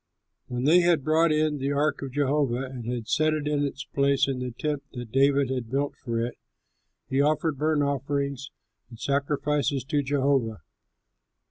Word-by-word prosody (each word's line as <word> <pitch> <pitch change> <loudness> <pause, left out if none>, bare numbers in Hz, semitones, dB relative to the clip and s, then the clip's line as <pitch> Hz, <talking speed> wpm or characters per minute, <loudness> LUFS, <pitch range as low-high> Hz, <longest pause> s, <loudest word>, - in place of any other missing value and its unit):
When 125 0 -3
they 160 +6 +6
had 170 -5 +3
brought 160 +3 +3
in 155 -1 +1
the 135 +1 -1
ark 145 +2 0
of 135 -2 -6
Jehovah 140 -3 +1
and 125 -3 -5
had 120 -3 -4
set 155 0 +2
it 150 -1 -3
in 145 -1 +1
its 140 0 -3
place 140 -1 +2
in 135 -2 -2
the 125 0 -3
tent 145 +4 -3
that 120 -3 -7
David 135 0 +3
had 125 -3 -3
built 140 +3 -1
for 115 -2 -2
it, 120 - -7 0.7
he 135 +1 +1
offered 150 0 +1
burnt 155 -1 +2
offerings 140 -1 -2 0.4
and 115 -2 -12
sacrifices 140 0 0
to 145 +2 0
Jehovah. 135 - 0
140 Hz, 170 wpm, -26 LUFS, 130-150 Hz, 0.7 s, they